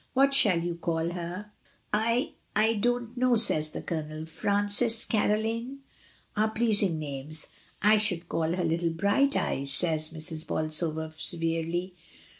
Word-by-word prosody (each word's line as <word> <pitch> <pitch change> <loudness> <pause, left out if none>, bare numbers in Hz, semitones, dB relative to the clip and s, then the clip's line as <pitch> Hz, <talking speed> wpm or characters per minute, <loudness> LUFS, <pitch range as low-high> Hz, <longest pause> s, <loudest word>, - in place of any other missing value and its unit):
What 275 +1 +3
shall 190 -10 +5
you 175 0 -3
call 165 -1 -2
her?" 180 +4 -6 0.4
"I 230 +4 0
— - - -40
I 225 - +2
don't 240 +2 -2
know," 250 0 +2
says 155 -9 +6
the - - -8
Colonel; 155 -1 -5
"Frances, 205 +6 +2
Caroline, 225 +5 -1 0.5
are 215 +1 +1
pleasing 215 -6 +1
names." 150 +1 -3 0.4
"I 210 +1 +5
should 180 -5 -1
call 165 0 -2
her 180 0 -2
little 165 +1 0
bright 200 - +1
eyes," 140 +1 -1
says 155 +1 +2
Mrs. 160 0 -3
Bolsover 155 0 0
severely. 165 +2 -2
175 Hz, 140 wpm, -27 LUFS, 160-220 Hz, 0.5 s, says